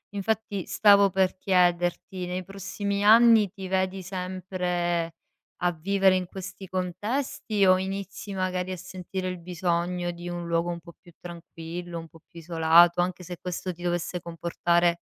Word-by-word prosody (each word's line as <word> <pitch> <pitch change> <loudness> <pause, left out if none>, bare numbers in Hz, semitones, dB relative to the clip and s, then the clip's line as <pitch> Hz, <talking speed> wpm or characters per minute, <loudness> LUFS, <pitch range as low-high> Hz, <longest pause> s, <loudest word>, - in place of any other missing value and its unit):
Infatti 205 -2 -2
stavo 200 -1 +5
per 190 0 +2
chiederti, 180 0 +1
nei 180 +1 -3
prossimi 200 +2 -3
anni 220 -2 +7
ti 195 -2 -8
vedi 190 0 0
sempre 180 -2 -2 0.5
a 175 0 +2
vivere 190 +3 +2
in 185 -1 -1
questi 190 0 -8
contesti, 200 +4 -1
o 185 0 +6
inizi 195 +1 -5
magari 185 -1 -2
a 185 - -4
sentire 185 +1 -6
il 180 -1 -5
bisogno 175 0 -1
di 175 0 -9
un 175 -1 -5
luogo 170 +1 0
un 170 - -5
po' 170 0 -14
più 175 - -18
tranquillo, 170 0 -7
un 165 - -9
po' 165 -2 -18
più 170 - -12
isolato, 170 +1 +5
anche 180 0 -2
se 175 0 -7
questo 180 0 -4
ti 175 +1 -12
dovesse 175 0 -2
comportare 170 0 0
180 Hz, 155 wpm, -26 LUFS, 175-190 Hz, 0.5 s, anni